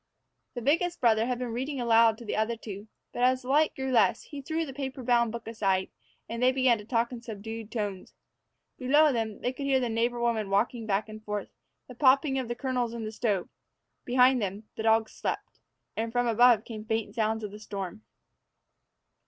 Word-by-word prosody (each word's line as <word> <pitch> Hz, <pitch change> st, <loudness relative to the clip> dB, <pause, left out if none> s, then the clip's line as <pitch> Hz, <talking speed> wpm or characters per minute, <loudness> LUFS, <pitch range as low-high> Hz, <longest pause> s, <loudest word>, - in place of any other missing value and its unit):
The 240 Hz, -, -5 dB
biggest 340 Hz, +6 st, +1 dB
brother 225 Hz, -2 st, +3 dB
had 250 Hz, -1 st, -1 dB
been 245 Hz, -2 st, -4 dB
reading 265 Hz, +3 st, -3 dB
aloud 230 Hz, -2 st, +4 dB
to 235 Hz, -, -11 dB
the 210 Hz, -, -2 dB
other 220 Hz, +2 st, 0 dB
two; 205 Hz, -1 st, -8 dB, 0.3 s
but, -, -, -4 dB
as 255 Hz, +1 st, +3 dB
the 250 Hz, -, -8 dB
light 300 Hz, +3 st, +3 dB
grew 265 Hz, 0 st, -3 dB
less, 220 Hz, -7 st, +3 dB
he 290 Hz, -2 st, -8 dB
threw 320 Hz, +4 st, -2 dB
the 270 Hz, -, -8 dB
paper 265 Hz, -1 st, -5 dB
bound 235 Hz, -2 st, +3 dB
book 235 Hz, 0 st, -7 dB
aside, 195 Hz, -4 st, 0 dB, 0.4 s
and 230 Hz, +1 st, -5 dB
they 255 Hz, +1 st, +5 dB
began 255 Hz, -3 st, +3 dB
to 210 Hz, -, -10 dB
talk 235 Hz, +1 st, 0 dB
in 240 Hz, -2 st, -7 dB
subdued 225 Hz, -1 st, -7 dB
tones. 205 Hz, -5 st, -4 dB, 0.6 s
Below 290 Hz, +3 st, +4 dB
them, 220 Hz, -3 st, -3 dB
they 250 Hz, -, -1 dB
could 275 Hz, +1 st, -4 dB
hear 270 Hz, -1 st, +3 dB
the 245 Hz, -2 st, -1 dB
neighbor 235 Hz, +2 st, 0 dB
woman 230 Hz, -4 st, 0 dB
walking 220 Hz, +3 st, 0 dB
back 205 Hz, +1 st, 0 dB
and 215 Hz, 0 st, -10 dB
forth, 210 Hz, -2 st, -4 dB, 0.4 s
and 250 Hz, -, -11 dB
the -, -, -35 dB
popping 270 Hz, 0 st, +4 dB
of 255 Hz, -, -3 dB
the 240 Hz, -, -3 dB
kernels 245 Hz, -2 st, -2 dB
in 230 Hz, -2 st, -4 dB
the 215 Hz, -, -4 dB
stove; 210 Hz, -5 st, -1 dB, 0.6 s
behind 250 Hz, 0 st, +4 dB
them, 200 Hz, +1 st, -3 dB
the -, -, -4 dB
dogs 220 Hz, 0 st, +3 dB
slept; -, -, -5 dB, 0.4 s
and 225 Hz, +1 st, -2 dB
from 245 Hz, +1 st, +1 dB
above 235 Hz, -1 st, +5 dB
came 215 Hz, -2 st, -7 dB
faint 220 Hz, -1 st, -2 dB
sounds 220 Hz, -1 st, 0 dB
of 210 Hz, -, -5 dB
the 210 Hz, -, -10 dB
storm. 200 Hz, -1 st, -6 dB
235 Hz, 210 wpm, -28 LUFS, 220-255 Hz, 0.6 s, they